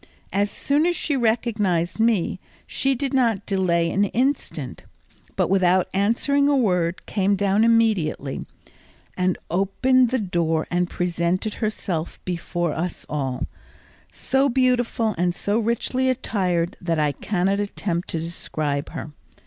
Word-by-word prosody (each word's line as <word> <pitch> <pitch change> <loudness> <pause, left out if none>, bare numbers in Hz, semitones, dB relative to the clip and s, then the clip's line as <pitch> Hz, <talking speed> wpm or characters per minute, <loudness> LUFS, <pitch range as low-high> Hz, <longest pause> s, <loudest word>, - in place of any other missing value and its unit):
As 200 +1 +2
soon 290 +9 +1
as 350 - +1
she 295 - -1
recognised 220 -7 0
me 225 -5 +2 0.3
she 270 0 0
did 270 +2 -2
not 235 -7 +2
delay 170 -4 +1
an 200 +3 +2
instant, 260 +7 -2 0.5
but - - +2
without 185 -1 +3
answering 245 +8 +2
a 285 - +3
word 180 -7 +1
came 200 -1 +1
down 200 +2 +2
immediately, 215 -12 +1 1.1
opened 245 +8 +3
the 260 - +1
door 170 -6 0
and 175 0 +1
presented 175 +4 -1
herself 195 -7 -3
before 175 -2 -2
us 175 +1 -4
all, 135 -4 -2 0.7
so 270 +1 +1
beautiful 245 -3 +1
and 175 0 +1
so 205 +2 0
richly 235 +3 0
attired 185 -9 0
that 170 -2 0
I 150 -1 +2
cannot 195 +6 0
attempt 195 -4 -2
to 165 - -3
describe 155 -3 -3
her. 155 - -6
195 Hz, 130 wpm, -23 LUFS, 170-235 Hz, 1.1 s, without